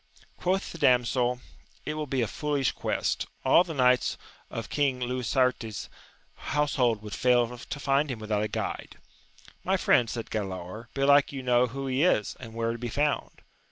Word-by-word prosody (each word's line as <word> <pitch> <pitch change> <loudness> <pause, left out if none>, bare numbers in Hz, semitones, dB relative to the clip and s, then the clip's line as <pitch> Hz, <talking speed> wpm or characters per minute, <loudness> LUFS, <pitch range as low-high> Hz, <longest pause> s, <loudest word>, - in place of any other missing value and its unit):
Quoth 190 +2 -1
the 170 - -9
damsel, 125 -1 +2 0.4
It 150 - -2
will 155 -1 -4
be 130 -2 0
a - - -1
foolish 145 +2 -1
quest: - - -2 0.2
all 175 - +6
the 165 -3 -7
knights 125 -1 +3 0.3
of - - -5
Eang 140 -3 0
Lisuarte's 125 -2 -1 0.5
household 130 -7 0
would 105 -2 -7
fail 125 +1 +2
to 140 +4 -7
find 140 +1 +1
him 125 - -3
without 110 -1 -1
a 105 - 0
guide. - - -4 0.7
My - - +1
friend, 120 -2 +3
said 115 -1 -5
Galaor, 95 +2 -5
belike 140 +1 +4
you 135 -2 -6
know 125 0 +3
who 135 +3 -5
he 130 +1 0
is, 155 - +2
and 115 -3 -10
where 115 0 0
to 115 - -5
be 120 0 -4
found 145 +4 -1
125 Hz, 170 wpm, -28 LUFS, 115-140 Hz, 0.7 s, all